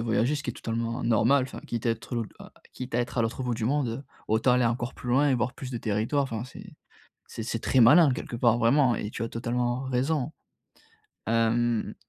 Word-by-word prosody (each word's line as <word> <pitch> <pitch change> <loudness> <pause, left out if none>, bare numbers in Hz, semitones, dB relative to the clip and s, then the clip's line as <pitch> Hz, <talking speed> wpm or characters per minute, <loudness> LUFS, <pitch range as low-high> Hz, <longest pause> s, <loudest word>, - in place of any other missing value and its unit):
voyager, 115 +5 +1
ce 145 - -5
qui - - -8
est - - -7
totalement 115 +1 -3
normal, 120 +4 +3
enfin 130 - -8
quitte 115 -1 -5
à - - +3
être 115 +2 -5
lou 115 - -1 0.5
quitte 125 -2 -7
à 120 - +2
être 120 +1 -4
à - - +3
l'autre 115 +3 -2
bout 125 - -1
du 110 -1 -3
monde, 140 0 +1
heu, 115 +4 -4 0.3
autant 110 +4 +3
aller 125 -1 +3
encore 120 +2 -1
plus 125 - -9
loin 140 +4 +4
et 130 - +3
voir 125 +1 -1
plus 130 -1 -7
de 120 - -3
territoires, 110 +7 0
enfin 115 -3 -4
c'est 125 - -12 0.5
c'est 115 - -6
c'est 115 0 -3
très 130 - +1
malin, 145 +6 +7
quelque 125 - -5
part, 120 -1 +3
vraiment 120 +1 +3
et 105 - -4
tu 115 - -4
as 115 - -3
totalement 120 +2 -1
raison, 135 +3 -1 1.0
hem, 115 0 +1
120 Hz, 225 wpm, -27 LUFS, 115-130 Hz, 1.0 s, malin